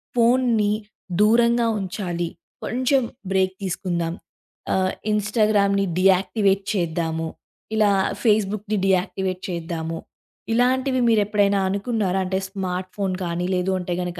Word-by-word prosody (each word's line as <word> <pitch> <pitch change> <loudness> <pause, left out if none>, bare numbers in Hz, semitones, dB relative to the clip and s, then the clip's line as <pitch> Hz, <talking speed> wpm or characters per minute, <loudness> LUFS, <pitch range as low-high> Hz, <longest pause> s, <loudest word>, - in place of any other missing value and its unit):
ఫోన్ని 235 -3 +3 0.5
దూరంగా 235 +2 +4
ఉంచాలి. 175 -3 -3 0.3
కొంచెం 260 +3 +1 0.3
బ్రేక్ 190 -1 +2
తీసుకుందాం, 170 -3 -2 0.6
ఆహ్, 185 0 +1 0.2
ఇన్‌స్టాగ్రామ్‌ని 205 -1 +2
డియాయాక్టివేట్ 195 +1 +3
చేద్దాము, 165 -3 -1 0.5
ఇలా 210 -2 +4 0.3
ఫేస్‌బుక్‌ని 215 -1 +1
డియాక్టివేట్ 185 0 0
చేద్దాము 165 -1 -4 0.6
ఇలాంటివి 255 +2 +2
మీరు 225 -2 +4
ఎప్పుడైనా 200 -1 +2
అనుకున్నారా? 200 -2 0
అంటే 190 +1 -1
స్మార్ట్ 185 -2 -4
ఫోన్ 195 -2 -1
కానీ, 175 0 -2
లేదు 185 +1 0
అంటే 180 0 -3
గనక, 175 0 -4
195 Hz, 105 wpm, -23 LUFS, 180-215 Hz, 0.6 s, దూరంగా